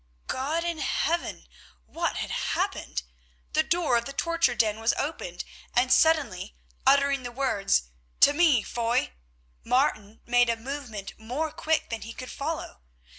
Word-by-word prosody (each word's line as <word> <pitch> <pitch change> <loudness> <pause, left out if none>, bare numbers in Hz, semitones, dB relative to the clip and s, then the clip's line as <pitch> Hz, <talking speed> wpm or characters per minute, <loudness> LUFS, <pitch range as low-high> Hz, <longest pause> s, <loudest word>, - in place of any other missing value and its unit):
God 300 +6 -1
in 340 -2 -2
Heaven! 320 - -1 0.4
What - - -2
had - - -3
happened? - - -2 0.5
The - - +4
door 335 -8 +2
of 235 - -2
the 275 - -6
torture 335 -4 +1
den 220 -2 +1
was 225 +1 +2
opened, 225 - -3 0.3
and 255 +1 +4
suddenly, 265 - +2 0.3
uttering 280 0 +4
the 245 -1 -6
words, 235 - +1 0.4
"To 285 - +8
me, 295 -8 +4
Foy!" 235 +1 0 0.5
Martin 230 -4 0
made 245 0 +4
a 230 - +1
movement 235 -5 -6
more 265 +8 -3
quick 315 -2 -1
than 230 - -3
he 230 - -7
could 255 +1 -8
follow. 300 - -4
255 Hz, 145 wpm, -27 LUFS, 225-300 Hz, 0.5 s, To